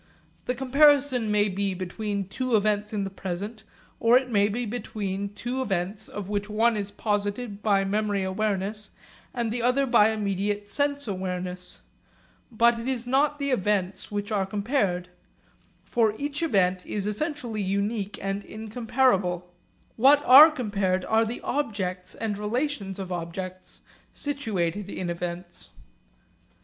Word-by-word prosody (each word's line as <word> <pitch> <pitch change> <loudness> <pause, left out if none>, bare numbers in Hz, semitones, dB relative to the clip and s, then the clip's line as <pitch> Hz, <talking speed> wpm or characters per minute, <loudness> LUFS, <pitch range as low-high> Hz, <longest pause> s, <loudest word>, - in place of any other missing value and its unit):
The 250 - -1
comparison 270 -2 +4
may 210 0 +3
be 195 0 -1
between 200 +2 -3
two 255 +4 -1
events 210 0 +1
in 210 -2 -1
the 195 - -4
present, 195 +4 -5 0.4
or 230 +2 +6
it 255 -1 -2
may 205 -1 +3
be 240 +4 -2
between 200 -3 -4
two 250 +4 -3
events 195 -1 -2
of 205 -2 -6
which 205 0 -2
one 225 +2 +2
is 205 -1 -3
posited 205 +1 -2
by 200 -2 +3
memory 205 0 0
awareness 205 +1 -2 0.4
and 235 -3 -2
the 240 +1 -2
other 250 +3 +3
by 235 -4 +5
immediate 205 -1 -1
sense 285 -2 0
awareness. 180 -2 -4 0.7
But 235 +1 +4
it 230 - -5
is 250 -2 -1
not 280 +4 +2
the 280 -1 -1
events 195 -4 0
which 205 +1 -3
are 195 -3 0
compared. 200 -4 -1 0.7
For 220 -3 +1
each 290 +3 -3
event 185 - +2
is 205 -2 -3
essentially 235 0 -3
unique 200 +2 -1
and 195 +1 -2
incomparable. 220 -5 0 0.4
What 280 +5 +5
are 280 +5 +10
compared 200 - -1
are 225 +1 +3
the 230 +2 -5
objects 200 -9 -3
and 210 -3 -3
relations 210 -2 -2
of 190 -2 -6
objects 180 +2 -6 0.3
situated 205 - -2
in 180 -3 -3
events. 175 0 -6
210 Hz, 140 wpm, -26 LUFS, 195-240 Hz, 0.7 s, are